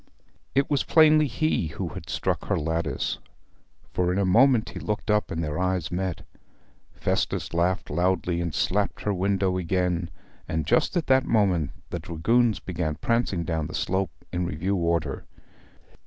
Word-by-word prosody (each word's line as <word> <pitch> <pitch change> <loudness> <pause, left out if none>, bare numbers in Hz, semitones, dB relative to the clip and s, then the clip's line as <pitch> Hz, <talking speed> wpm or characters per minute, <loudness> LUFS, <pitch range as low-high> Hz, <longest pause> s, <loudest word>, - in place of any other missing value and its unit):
It 140 0 +3
was 145 -3 +1
plainly 155 -1 +5
he 150 - 0
who 75 - -4
had - - -9
struck - - -1
her - - 0
lattice, 80 -3 -2 0.7
for 90 0 +1
in 90 - 0
a 100 - +2
moment 120 +4 +4
he - - -7
looked 105 +1 -2
up, 105 0 +2
and 80 0 -2
their 75 +1 -3
eyes 90 -3 0
met. 90 -1 -3 0.7
Festus - - -1
laughed 85 +2 +1
loudly, 85 +1 +1
and 85 -1 -2
slapped 90 +7 0
her 105 - 0
window 95 0 +1
again; 90 -1 0 0.4
and 80 -1 -1
just 175 - +2
at 165 - 0
that 130 -1 +4
moment 95 - +2 0.2
the 85 - -2
dragoons 100 +7 +1
began 85 -4 -3
prancing 115 -6 0
down 80 -3 -2
the - - -6
slope 95 -3 -2
in 90 0 0
review 85 +4 -1
order. 85 -5 -1
90 Hz, 160 wpm, -26 LUFS, 85-105 Hz, 0.7 s, plainly